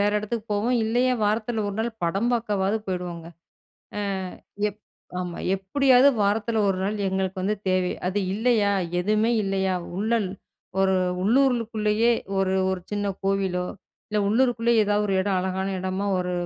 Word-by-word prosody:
வேற 205 +1 +3
இடத்துக்கு 215 +1 -4
போவோம். 225 +5 +1
இல்லையா, 245 +3 +2
வாரத்தில 220 +2 0
ஒரு 200 - -4
நாள் 230 +2 0
படம் 195 +8 0
பார்க்கவாவது 210 -3 0
போயிடுவோங்க! 180 -3 -4 0.7
அ - - -1 0.7
எப் 210 +1 -11 0.4
ஆமா, 180 -1 -5 0.2
எப்படியாவது 255 +7 +4
வாரத்தில 215 +2 +1
ஒரு 190 -1 0
நாள் 205 +2 -1
எங்களுக்கு 190 0 -2
வந்து 210 +3 0
தேவை. 185 -1 +1
அது 190 +3 0 0.2
இல்லையா, 220 -2 +2 0.3
எதுவுமே 215 +4 +2
இல்லையா, 190 -1 0 0.2
உள்ளல். 215 0 +1 0.5
ஒரு 190 0 +3 0.3
உள்ளூருலுக்குள்ளயே 230 -1 +2 0.3
ஒரு 190 0 +1 0.2
ஒரு 190 -1 -2
சின்ன 205 0 -1 0.2
கோவிலோ, 190 -2 0 0.4
இல்ல 210 - 0
உள்ளூருக்குள்ளேயே 235 0 +3
ஏதாவது 205 0 +1
ஒரு 195 - +1
இடம். 190 -1 +1
அழகான 190 +1 -2
இடமா 190 +2 -2
ஒரு 180 0 -2
205 Hz, 140 wpm, -25 LUFS, 190-225 Hz, 0.7 s, எப்படியாவது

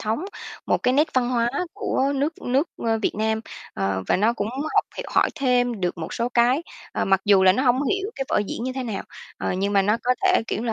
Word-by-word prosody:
thống, 225 - -2 0.4
một - - +2
cái 250 - +2
nét 300 +3 +3
văn 250 -1 +2
hóa 235 -1 +1 0.2
của 285 -10 0
nước 290 +4 -2
nước, 270 +6 +1 0.2
ơ, 225 -1 +1
Việt - - 0
Nam. 220 +1 0 0.3
Ờ, 95 -1 -1
và - - +4
nó 215 +5 +3
cũng 205 -3 -3 0.3
học - - +4
h - - -3
hỏi - - +4
thêm 245 -6 +1
được 180 0 -1
một 165 +2 -5
số 235 +1 -1
cái, 245 +5 +3 0.3
ờ, - - -1
mặc 195 -1 +3
dù 200 -2 +5
là 185 - +7
nó 255 +7 0
hông 255 +1 +3
hiểu 390 +7 -1
cái 270 - -3
vở - - +2
diễn 230 - -4
như 255 - -2
thế 260 - -4
nào. 220 -5 -4 0.4
Ờ, - - -1
nhưng 195 +2 -1
mà 195 - +4
nó 210 +3 +2
có 250 +1 +2
thể, 370 -9 +4
kiểu, 220 - -2
là 230 -2 -1
240 Hz, 250 wpm, -23 LUFS, 205-265 Hz, 0.4 s, là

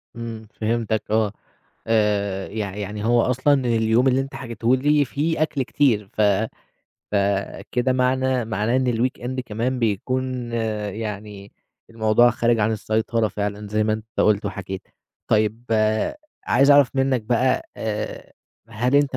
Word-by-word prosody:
إمم 115 -2 -7
فهمتك 110 -1 -1
آه، 110 -2 +2 0.6
آآ 100 -3 +1
يع 100 -2 -4
يعني 105 0 -5
هو 120 0 +4
أصلًا 130 +4 +2
اليوم 115 +1 +2
اللي 130 +1 +3
أنت 135 0 -7
حكيته 120 -2 0
لي، 145 +2 +3
فيه 155 +4 -1
أكل 155 -3 0
كتير 120 -7 +1
ف - - -1 0.9
فكده 100 +5 0
معنا 130 0 +1
معناه 110 +2 0
إن 130 -2 +1
الweekend 130 +1 -2
كمان 120 +4 -2
بيكون 125 +3 -2 0.4
يعني 105 -2 -6 0.4
الموضوع 115 +1 +4
خارج 120 0 +1
عن 110 +1 +2
السيطرة 110 +1 0
فعلًا، 105 +1 -4
زي 110 +1 +1
ما 110 - +1
أنت 110 +1 -4
قُلت 105 -1 +3
وحكيت، 95 -1 -5 0.5
طيب 110 +2 +1 0.8
عايز 135 +3 +4
أعرف 140 -3 +6
منك 135 -3 +1
بقى، 125 +3 +1
آآ 110 -1 -4 0.4
هل 120 +4 -1
أنت 145 -2 +2
115 Hz, 135 wpm, -22 LUFS, 105-130 Hz, 0.9 s, أعرف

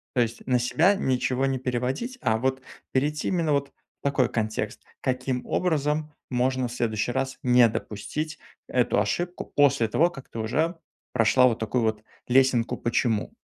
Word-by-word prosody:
То 125 - +4
есть 115 0 -2
на 125 -1 +2
себя 160 +11 +3
ничего 130 -4 0
не 135 -1 0
переводить, 130 - -2
а 110 - +2
вот 130 +3 -1 0.3
перейти 150 +3 0
именно 165 -5 +1
вот 140 -1 0
в - - -46
такой 135 -3 +2
контекст: 110 -1 -2 0.2
"Каким 130 -1 -1
образом 155 -3 0 0.2
можно 130 0 +1
в 120 - -8
следующий 115 -1 -1
раз 135 +1 -2
не 125 -1 +6
допустить 150 +10 -4 0.3
эту - - +2
ошибку 175 +1 -2
после 140 -5 +4
того, 160 +10 +3
как 135 -6 -11
ты 115 - -7
уже 155 +10 0 0.4
прошла 125 +2 +5
вот 115 -3 0
такую 115 +2 0
вот 110 -1 -1 0.2
лесенку 125 -2 +3
'почему'". 115 -2 0
130 Hz, 160 wpm, -26 LUFS, 120-145 Hz, 0.4 s, не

